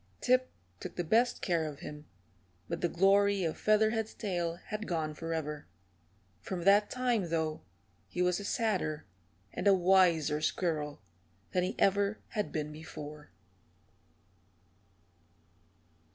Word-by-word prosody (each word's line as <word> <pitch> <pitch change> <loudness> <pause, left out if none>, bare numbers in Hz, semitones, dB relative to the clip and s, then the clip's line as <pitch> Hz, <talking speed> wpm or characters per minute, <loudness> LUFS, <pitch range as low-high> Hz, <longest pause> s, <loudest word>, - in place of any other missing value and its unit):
Tip 255 +1 +3 0.3
took - - -7
the 175 - -1
best 230 +8 +3
of - - -15
care 170 -3 +1
of 145 -2 -8
him, 150 0 -8 0.6
but - - -4
the 175 - +1
glory 195 +2 +4
of 160 -2 -1
Featherhead's 220 +1 +2
tail 175 -5 -2
had 215 +4 -6
gone 160 -3 -1
forever. 155 -2 -4 0.7
From 180 -3 -5
that 200 +2 +5
time, 245 -8 0
though, 160 -1 -1 0.5
he - - -7
was 180 +1 +2
a - - -6
sadder 195 -9 -1 0.5
and 205 - -1
a 200 - +7
wiser 175 -5 +4
squirrel 150 - -1 0.5
than 180 - +2
he 185 - -2
ever 200 +2 +2
had 210 -2 -2
been 150 -1 -3
before. 150 -1 -9
180 Hz, 130 wpm, -32 LUFS, 155-205 Hz, 0.7 s, a